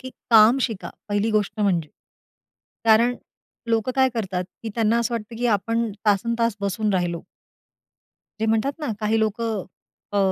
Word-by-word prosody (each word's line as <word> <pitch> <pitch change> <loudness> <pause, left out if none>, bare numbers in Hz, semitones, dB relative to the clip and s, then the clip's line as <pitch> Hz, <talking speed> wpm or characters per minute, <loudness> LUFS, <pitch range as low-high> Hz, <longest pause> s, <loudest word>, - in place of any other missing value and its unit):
की 260 - -8 0.2
काम 225 +4 +7
शिका, 225 -6 -2 0.2
पहिली 205 +2 0
गोष्ट 215 0 0
म्हणजे. 175 -7 +1 1.0
कारण 230 +2 +5 0.6
लोकं 225 +2 +1
काय 260 0 +5
करतात, 190 -5 -2 0.2
की 225 - -4
त्यांना 230 0 +2
असं 235 0 -1
वाटतं 225 0 -5
की 245 - 0
आपण 230 +1 0 0.2
तासनतास 230 +2 +1
बसून 205 +1 -1
राहिलो. 175 -2 -1 1.2
जे 220 - +1
म्हणतात 225 +5 +1
ना, 300 - -4
काही 220 +1 +1
लोकं 220 -1 -1 0.5
अ, 205 - +1
220 Hz, 145 wpm, -23 LUFS, 205-230 Hz, 1.2 s, काम